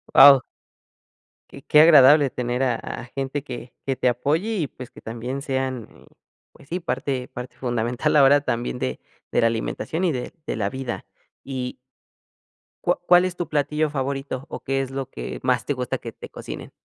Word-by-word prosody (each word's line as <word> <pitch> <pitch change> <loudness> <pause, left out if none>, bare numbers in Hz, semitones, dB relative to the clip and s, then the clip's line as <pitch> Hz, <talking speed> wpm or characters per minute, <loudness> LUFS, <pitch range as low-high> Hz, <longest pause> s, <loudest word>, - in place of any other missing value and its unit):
Wao. 140 -1 +10 1.1
Y 140 - -11
qué 150 +1 +4
agradable 145 -2 +7
tener 125 0 -2
a 125 -3 +2
a 120 - -6
gente 135 +2 -4
que 125 -2 -8
que 135 - 0
te 125 0 +2
apoye 155 - 0
y 160 -6 0
pues 125 -2 -10
que - - -15
también 120 +4 -5
sean, 130 -4 -2
eh, - - -18 0.5
pues - - -19
sí 180 - -2
parte 130 -4 -2
parte 125 +1 -8
fundamental 120 +4 -1
ahora 145 0 +6
también 120 -2 -2
de 65 0 -3 0.3
de - - +2
la 115 - +5
alimentación 115 +9 -2
y 180 - +3
de 125 -3 -4
de - - -2
la 100 -3 0
vida 130 +1 -5 0.4
y 130 -2 -4 1.1
¿cuá - - +1
cuál 180 0 +6
es 185 -1 -3
tu 175 -2 -3
platillo 150 +1 0
favorito? 135 -1 -3
O, - - -6
¿qué 135 0 -1
es 135 - -5
lo 135 -1 -4
que - - -6
más 130 0 +1
te 145 - 0
gusta 125 -2 -2
que - - -8
te - - -11
cocinen? - - -8
135 Hz, 185 wpm, -23 LUFS, 125-145 Hz, 1.1 s, Wao